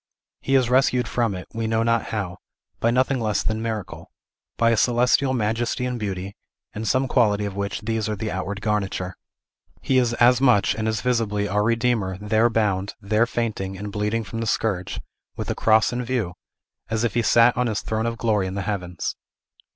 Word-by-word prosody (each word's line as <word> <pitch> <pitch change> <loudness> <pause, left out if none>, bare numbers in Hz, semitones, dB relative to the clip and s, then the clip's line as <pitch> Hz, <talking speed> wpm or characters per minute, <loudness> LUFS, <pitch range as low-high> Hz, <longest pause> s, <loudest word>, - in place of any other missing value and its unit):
He 135 - 0
is 130 -2 +4
rescued 125 0 +2
from 115 -5 0
it, 90 - -8
we 115 0 -2
know 110 0 +1
not 115 0 +1
how, 100 -4 -4 0.4
by 115 - +2
nothing 130 +2 +2
less 110 -3 0
than 110 0 -1
miracle, 110 -4 -5 0.5
by 115 0 +4
a - - +3
celestial 125 +4 +3
majesty 120 +1 -1
and 125 -1 -3
beauty, 100 -2 -4 0.4
and 110 +1 -4
some 130 +5 +2
quality 105 -5 +2
of 100 -1 -5
which 100 +1 -3
these 110 0 -2
are 105 - -1
the 105 +1 -4
outward 100 +2 -4
garniture. 100 -3 -1 0.7
He 130 -1 +3
is 120 -2 +1
as 125 +2 +4
much, 115 -7 +4
and 110 0 -3
as 110 -1 -1
visibly, 110 -5 0
our 105 +1 +1
Redeemer, 115 -4 +1
there 110 +3 +2
bound, 100 -3 0
there 110 +4 +1
fainting, 105 -6 -3
and 105 +1 -6
bleeding 105 +3 -1
from 115 +1 -6
the 115 - -2
scourge, 100 -5 -1 0.4
with - - -4
the - - +1
cross 110 +2 +3
in 125 +1 -2
view, 120 -7 -2 0.6
as 110 0 -1
if 120 - 0
he 120 - +2
sat 115 +1 +5
on 125 0 +1
his 110 -3 -1
throne 110 +1 -2
of 115 0 -3
glory 105 -5 +1
in 95 - -5
the 100 - -2
heavens! 90 -4 -3
110 Hz, 195 wpm, -23 LUFS, 100-120 Hz, 0.7 s, sat